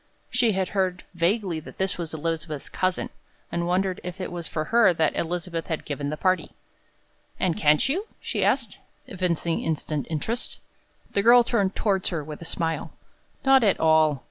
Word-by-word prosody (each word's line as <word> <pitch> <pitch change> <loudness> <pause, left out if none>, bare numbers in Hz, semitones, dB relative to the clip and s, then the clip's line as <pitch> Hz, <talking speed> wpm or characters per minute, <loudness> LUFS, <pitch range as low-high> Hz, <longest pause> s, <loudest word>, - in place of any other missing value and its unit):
She 245 -4 +3
had 190 -1 0
heard 185 -2 -1
vaguely 175 0 0
that 155 - -12
this 190 -1 -1
was 165 -2 -4
Elizabeth's 160 -2 -3
cousin, 185 0 -1 0.4
and 170 0 -1
wondered 185 +1 0
if 180 +2 -6
it 185 - -4
was 170 -2 -4
for 155 - -2
her 230 -7 +6
that 160 -1 +2
Elizabeth 170 0 -3
had 160 - -3
given 145 -1 -3
the 155 - -3
party. 185 +2 +1 0.9
"And 180 -3 +1
can't 150 0 +4
you?" 370 +11 -1
she - - -2
asked, 235 -7 0 0.3
evincing 175 -3 -1
instant 155 -2 -2
interest. 220 +10 -2 0.5
The 200 - +1
girl 240 +3 +7
turned 200 -5 0
toward 195 -3 +1
her 165 -4 -1
with 150 +1 -8
a - - -7
smile. 165 0 -2 0.5
"Not 270 -2 +6
at 200 -3 +3
all. 155 -3 +4
175 Hz, 170 wpm, -25 LUFS, 160-195 Hz, 0.9 s, girl